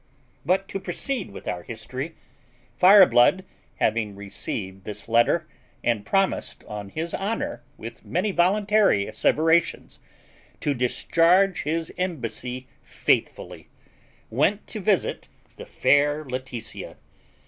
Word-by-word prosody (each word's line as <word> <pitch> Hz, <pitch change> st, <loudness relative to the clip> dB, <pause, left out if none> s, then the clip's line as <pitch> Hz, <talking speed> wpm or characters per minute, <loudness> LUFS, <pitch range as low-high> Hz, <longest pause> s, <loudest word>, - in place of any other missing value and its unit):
But 190 Hz, +2 st, +1 dB
to 195 Hz, -, -4 dB
proceed 205 Hz, +5 st, -3 dB
with 100 Hz, -, -11 dB
our 90 Hz, -, -3 dB
history; 130 Hz, -, -6 dB, 0.6 s
Fireblood, 185 Hz, -3 st, +6 dB, 0.3 s
having 110 Hz, -2 st, 0 dB
received 95 Hz, -1 st, -5 dB
this 105 Hz, 0 st, -7 dB
letter, 120 Hz, +8 st, +3 dB, 0.4 s
and 115 Hz, -4 st, 0 dB
promised 195 Hz, -, 0 dB
on 105 Hz, -2 st, -7 dB
his 165 Hz, +8 st, -4 dB
honour, 195 Hz, -, -3 dB, 0.2 s
with 115 Hz, +1 st, -9 dB
many 190 Hz, +4 st, -1 dB
voluntary 195 Hz, -, +3 dB
asseverations, 160 Hz, +9 st, +1 dB, 0.6 s
to 145 Hz, -, 0 dB
discharge 170 Hz, +9 st, +2 dB
his 160 Hz, +2 st, -2 dB
embassy 130 Hz, -7 st, -3 dB, 0.2 s
faithfully, -, -, -2 dB, 0.6 s
went -, -, +1 dB
to -, -, -6 dB
visit -, -, 0 dB, 0.3 s
the -, -, -10 dB
fair 145 Hz, +1 st, +2 dB
Laetitia. 130 Hz, -3 st, -6 dB
145 Hz, 105 wpm, -24 LUFS, 115-185 Hz, 0.6 s, Fireblood